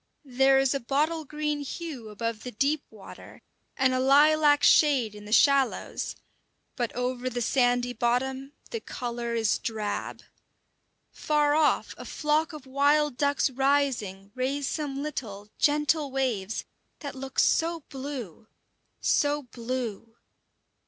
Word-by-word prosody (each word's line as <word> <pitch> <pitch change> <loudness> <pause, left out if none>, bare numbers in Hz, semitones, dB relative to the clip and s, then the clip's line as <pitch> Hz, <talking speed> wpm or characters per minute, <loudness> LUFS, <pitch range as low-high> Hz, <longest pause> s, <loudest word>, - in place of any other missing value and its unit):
There 270 +1 +4
is 270 0 +3
a 275 - -1
bottle 300 +6 0
green 300 0 -2
hue 285 -5 -6
above 225 +1 -4
the 250 - -6
deep 280 +6 0
water, 210 -3 -13 0.3
and 260 -1 +3
a 255 - +1
lilac 290 +2 +5
shade 265 -8 +4
in 210 0 -11
the 210 - -9
shallows; 275 +2 +2 0.6
but 240 -3 -2
over 250 0 -2
the 245 -1 -4
sandy 245 0 +1
bottom 260 +4 -1 0.2
the 460 - -3
colour 240 - -4
is 225 -2 +1
drab. 215 -3 -4 0.9
Far 295 -1 +1
off 305 -1 +2
a - - -8
flock 305 +1 0
of 300 -4 -10
wild 285 +1 +2
ducks 285 0 +1
rising 260 -8 0
raise 270 +2 -2
some 285 -3 -3
little, 210 -9 -6
gentle 295 0 +2
waves, 240 -7 -2 0.4
that 285 -3 -5
look 265 0 -8
so 330 0 +2
blue, 260 - -7 0.5
so 290 0 +1
blue! 230 -2 -5
270 Hz, 130 wpm, -27 LUFS, 240-290 Hz, 0.9 s, lilac